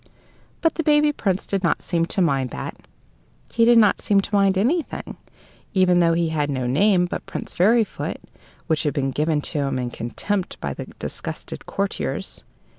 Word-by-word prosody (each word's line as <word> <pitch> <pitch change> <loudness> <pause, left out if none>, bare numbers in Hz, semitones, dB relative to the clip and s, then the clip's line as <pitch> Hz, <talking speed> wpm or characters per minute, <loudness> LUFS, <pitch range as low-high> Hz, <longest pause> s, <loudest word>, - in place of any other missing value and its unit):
But 325 - +3
the 325 - -2
baby 300 0 +4
Prince 195 -9 -1
did 195 -1 -1
not 170 -4 0
seem 170 -1 0
to 190 - +1
mind 135 -6 +1
that - - -6 0.8
he 230 -1 +4
did 240 0 +6
not 210 -3 +4
seem 200 -1 +3
to 200 - -9
mind 195 -1 +3
anything, 285 - -1 0.6
even 180 -2 +4
though 170 -1 +4
he 165 0 +1
had 150 -2 -1
no 130 -3 -2
name 180 +8 +3
but 175 - -5
Prince - - -5
Fairyfoot, 220 +4 +1 0.5
which 160 -1 +1
had 150 -3 -1
been 135 -1 0
given 150 +1 0
him 140 -4 -1
in 125 -1 -3
contempt 180 - -3
by - - -3
the - - -7
disgusted - - -6
courtiers. 200 0 -3
180 Hz, 175 wpm, -23 LUFS, 150-205 Hz, 0.8 s, did